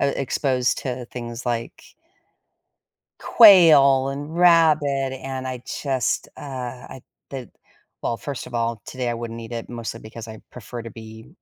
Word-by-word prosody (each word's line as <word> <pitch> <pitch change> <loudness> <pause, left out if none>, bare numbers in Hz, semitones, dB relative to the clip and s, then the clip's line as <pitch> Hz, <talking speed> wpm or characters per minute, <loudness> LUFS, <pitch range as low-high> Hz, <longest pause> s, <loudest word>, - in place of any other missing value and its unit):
uh, 140 0 +2
exposed 130 -1 0
to 125 -2 -4
things 120 -1 -7
like 120 -1 -4 1.3
quail, 150 - +7
and 145 +3 -6
rabbit, 155 -6 +4
and 130 -1 -5
I 125 -1 -5 0.2
just, 130 -5 -1
ugh, - - -9 0.5
I 130 - -10 0.3
th 130 -3 -7 0.5
Well, 115 - -1
first 140 +2 -6
of - - -12
all, 115 -1 -1
today 125 -2 -3
I - - -2
wouldn't 115 0 -6
eat 115 +1 -9
it, 115 -1 -5
mostly 115 -1 -6
because 110 +1 -10
I 110 -1 -10
prefer 120 0 -8
to 115 - -8
be 110 0 -12
125 Hz, 150 wpm, -22 LUFS, 115-140 Hz, 1.3 s, quail